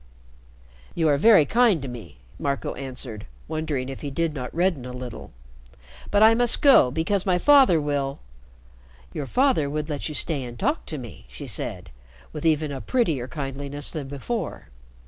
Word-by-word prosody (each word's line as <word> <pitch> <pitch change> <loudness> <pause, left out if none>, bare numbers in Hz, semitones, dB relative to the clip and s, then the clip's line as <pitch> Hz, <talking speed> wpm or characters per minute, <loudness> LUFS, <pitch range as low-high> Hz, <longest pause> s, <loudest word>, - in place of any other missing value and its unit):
"You 165 -2 +2
are 145 - +3
very 210 -4 +6
kind 225 - +3
to - - -4
me," 115 - -9 0.2
Marco 140 -1 -2
answered, 125 -5 -7 0.2
wondering 155 -5 -3
if 135 -1 -7
he 145 - -4
did 165 +3 -1
not 125 -4 -5
redden 170 -5 0
a 125 - -7
little. 125 -1 -8 0.8
"But 205 +1 +4
I 220 +1 +7
must 240 0 +3
go 275 - +7
because 165 +8 0
my 180 -1 +3
father 265 - +5
will 145 -2 -2 0.5
" 60 +1 -26
"Your 140 - -4
father 250 - +2
would 150 +1 -3
let 145 +2 -3
you 155 - -6
stay 145 -4 -1
and 120 -1 -8
talk 290 - -1
to 155 - -5
me," 115 - -10
she - - -9
said, - - -4 0.4
with 155 +1 -2
even 155 -1 +1
a 135 -2 -5
prettier 160 - 0
kindliness 140 +1 -4
than 150 -4 -5
before. 155 - -5
145 Hz, 175 wpm, -24 LUFS, 130-175 Hz, 0.8 s, I